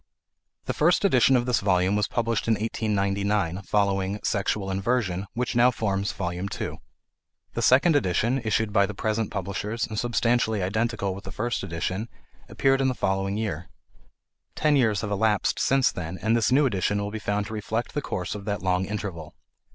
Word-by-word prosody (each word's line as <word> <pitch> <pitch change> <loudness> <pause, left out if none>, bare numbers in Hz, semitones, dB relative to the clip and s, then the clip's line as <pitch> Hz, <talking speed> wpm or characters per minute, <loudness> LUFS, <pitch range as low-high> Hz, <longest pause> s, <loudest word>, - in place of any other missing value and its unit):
The - - -1
first 175 +6 +3
edition 130 -6 +5
of 120 -1 +2
this 125 -3 +2
volume 95 0 +2
was 105 0 +1
published 115 -1 -1
in 115 - +4
1899, 100 -3 -1
following 100 0 0
"Sexual 100 -1 -1
Inversion," 95 -2 -1
which 125 +1 -2
now 120 +1 +6
forms 100 -3 -1
Volume 90 0 -3
II. - - -5 0.7
The - - -2
second 150 +6 +5
edition, 120 +2 +1
issued 110 -1 0
by 100 -2 +4
the 105 - -7
present 110 0 -1
publishers 100 +3 -3
and 110 -1 -4
substantially 115 -3 +1
identical 105 0 -1
with 100 +2 -9
the - - -8
first 120 +3 -2
edition, 95 +4 -3 0.4
appeared 135 0 +2
in 135 - +2
the 130 - 0
following 95 0 -1
year. 95 -6 -3 0.9
Ten 150 -1 +2
years 110 -7 +2
have 105 - -4
elapsed 105 0 +1
since 135 -1 +3
then 85 +1 -5
and 110 +5 +1
this 115 +1 +2
new 140 +3 +5
edition 100 -3 0
will 100 0 -3
be 110 - -4
found 105 0 -1
to 110 - -7
reflect 110 +2 -3
the 145 - -1
course 90 -8 -4
of 100 -1 -7
that 100 -3 -3
long 90 0 +1
interval. 95 -6 -5
105 Hz, 180 wpm, -25 LUFS, 95-115 Hz, 0.9 s, now